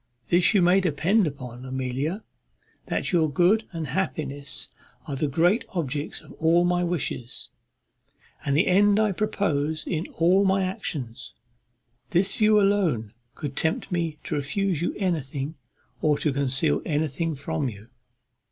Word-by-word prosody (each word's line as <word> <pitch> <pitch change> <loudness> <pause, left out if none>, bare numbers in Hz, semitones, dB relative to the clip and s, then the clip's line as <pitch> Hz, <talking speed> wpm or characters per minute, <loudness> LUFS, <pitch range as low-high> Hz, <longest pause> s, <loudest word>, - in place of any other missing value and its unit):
This 175 +4 +4
you 190 - +5
may 180 +2 +5
depend 180 +4 +2
upon, 125 -4 -7
Amelia, 130 - -3 0.6
that - - -1
your 165 -4 +3
good 185 +9 +3
and 165 -3 -4
happiness 140 -4 -3 0.4
are 145 -4 -4
the 150 +3 0
great 175 - +2
objects 145 -3 -2
of - - -15
all 165 +2 +4
my 175 0 +2
wishes, 165 -8 -3 0.9
and 140 0 +1
the 170 - +4
end 205 +3 +4
I 215 -1 +3
propose 160 -7 -1
in 165 -1 -2
all 180 +4 +4
my 190 0 +2
actions. 145 -10 -4 0.7
This 190 +3 +2
view 215 -1 +5
alone 180 - +1 0.2
could 140 -2 -5
tempt 160 +4 -1
me 165 -3 -1
to - - -4
refuse 160 +4 -1
you 175 - -1
anything, 150 -6 -2 0.5
or 150 -2 +3
to 150 - 0
conceal 130 - +1
anything 155 +1 -1
from 145 0 -2
you." 105 0 -11
160 Hz, 145 wpm, -25 LUFS, 140-185 Hz, 0.9 s, you